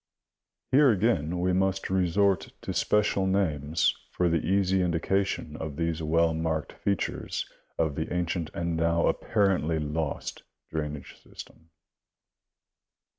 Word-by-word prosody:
Here 140 +1 +6
again 90 -6 +1
we 90 0 +2
must 95 +1 0
resort 95 +1 +2
to - - -3
special 100 -2 +2
names 80 -5 +1
for 90 -1 +1
the 85 0 +1
easy 95 -1 +2
indication 90 -1 0
of 80 -3 -5
these 80 0 -1
well 80 +1 +2
marked 80 -1 -2
features 100 -1 -2 0.3
of 80 -3 +1
the 80 +3 -4
ancient 85 -2 -1
and 85 -1 -1
now 85 +1 +2
apparently 95 -7 +1
lost 75 0 -3 0.3
drainage 75 -2 -5
system. 80 0 -13
85 Hz, 120 wpm, -28 LUFS, 80-95 Hz, 0.3 s, Here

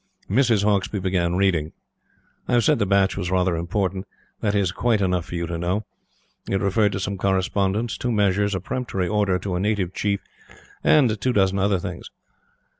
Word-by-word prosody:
Mrs. 115 -3 +3
Hauksbee 105 0 +1
began 90 -2 0
reading. 90 -5 +1 0.7
I - - -1
have 120 -1 +4
said - - +3
the 100 - +1
batch 100 0 +2
was 90 -3 -3
rather 90 -1 +1
important. 95 +2 -2 0.3
That 105 -1 0
is 100 -3 +1
quite 110 +3 +1
enough 90 -3 0
for - - -6
you 85 0 -2
to 85 0 -4
know. 95 +5 -1 0.6
It 95 - +1
referred 100 +1 +2
to 95 - -2
some 100 0 -3
correspondence, 95 +3 0
two 125 -1 -1
measures, 100 -1 +1
a - - -1
peremptory 95 -3 -3
order 100 -2 +1
to 95 0 -4
a 90 - -1
native 100 -2 -1
chief 100 0 -1 0.6
and 120 -9 +3
two 130 - +1
dozen 95 -2 +2
other 100 0 +2
things. 90 -1 -7
100 Hz, 185 wpm, -23 LUFS, 90-105 Hz, 0.7 s, have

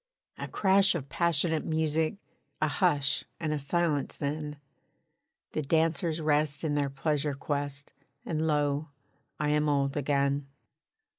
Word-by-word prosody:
A - - -4
crash 195 -1 +4
of 140 -5 -4
passionate 160 +1 +1
music, 160 +1 +1 0.4
A 155 - +2
hush 145 -3 +2 0.2
and 155 -2 -1
a 150 - -1
silence 150 0 0
then; 150 0 -3 0.9
The 155 - -1
dancers 160 +2 +1
rest 150 -1 +1
in 155 -2 0
their 145 -1 +1
pleasure 145 +1 -1
quest, 140 0 -4 0.3
And 160 0 -1
lo! 145 0 +1 0.5
I 150 -1 +1
am 150 0 +2
old 140 -1 +1
again. 140 -1 +1
150 Hz, 130 wpm, -29 LUFS, 140-160 Hz, 0.9 s, crash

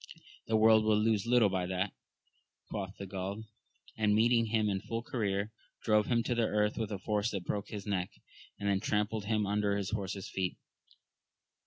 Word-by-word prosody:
The 110 - +3
world 110 0 +6
will 110 -1 +3
lose 110 -1 +1
little 120 -3 +5
by 95 -1 -1
that, 95 +1 -1 0.8
quoth 100 -2 -4
he - - -6
of 95 - -8
Gaul; 100 +3 -4 0.5
and 105 -1 +2
meeting 115 +1 +4
him 110 -1 +1
in 95 -2 -1
full 115 0 -4
career, 105 -4 -1 0.3
drove 105 -1 +3
him 120 -2 +2
to 120 - 0
the 115 -2 +2
earth 105 0 +1
with 110 -2 -3
a 100 - -2
force 105 +2 0
that 95 -5 -4
broke 100 -1 -2
his 105 -2 -6
neck, 95 -3 -1 0.5
and 100 - -2
then 100 -1 +2
trampled 105 +1 -1
him 105 0 +1
under 100 0 +1
his 100 0 -3
horse's 100 -2 -3
feet. 95 -2 -2
105 Hz, 190 wpm, -32 LUFS, 100-110 Hz, 0.8 s, world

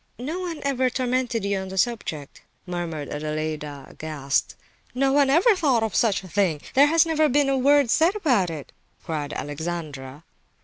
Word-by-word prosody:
"No 300 +9 -4
one 345 -4 -5
ever 260 -2 +1
tormented 250 -3 -1
you 200 -1 0
on 190 - -5
the 190 0 -7
subject," 180 - -2 0.2
murmured 170 -5 -4
Adelaida, 150 -2 -4
aghast. 145 -3 -2 0.4
"No 270 +1 +2
one 280 -1 +4
ever 360 - +5
thought 275 -10 +2
of 220 - -2
such 215 -5 +2
a - - -10
thing! 180 -5 +1
There 280 +2 +6
has 330 +2 +4
never 310 -2 +2
been 285 +1 +2
a 270 - +2
word 280 -1 +4
said 335 +5 +3
about 250 - +2
it!" 155 -4 -7 0.3
cried 150 -3 -4
Alexandra. 145 -2 -5
215 Hz, 170 wpm, -24 LUFS, -, 0.4 s, There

